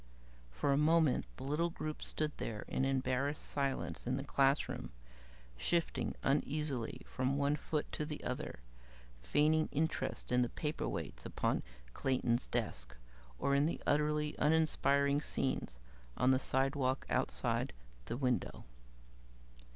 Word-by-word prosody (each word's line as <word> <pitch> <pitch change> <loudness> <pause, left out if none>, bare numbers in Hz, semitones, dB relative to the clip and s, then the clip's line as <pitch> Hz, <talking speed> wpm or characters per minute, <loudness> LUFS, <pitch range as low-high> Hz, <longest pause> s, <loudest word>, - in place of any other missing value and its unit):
For 60 - +1
a - - +3
moment, 155 -2 +4
the - - -7
little 150 +5 +1
group 155 -2 -5
stood 155 -1 -1
there 105 -2 -4
in 135 - 0
embarrassed 135 +2 0
silence 125 - -2
in 130 +1 +1
the 135 - -3
classroom, 140 +1 +1 0.7
shifting 170 - 0
uneasily 140 -3 -1
from 130 +2 -1
one 145 +1 +2
foot 150 0 -2
to - - -2
the 150 -1 -5
other, 125 - -4 0.6
feigning 155 - +3
interest 155 -2 -1
in 125 0 +4
the 120 - +1
paperweights 85 - -3
upon - - 0 0.3
Clayton's 125 - +1
desk, - - -3 0.4
or 140 - +1
in 140 +2 +4
the 170 - -2
utterly 150 0 +2
uninspiring 145 -2 +3
scenes 130 - -2 0.4
on 125 - +4
the 130 - +4
sidewalk 135 0 +1
outside - - +1 0.3
the 90 - -3
window. 125 -2 -1
140 Hz, 130 wpm, -35 LUFS, 130-150 Hz, 0.7 s, moment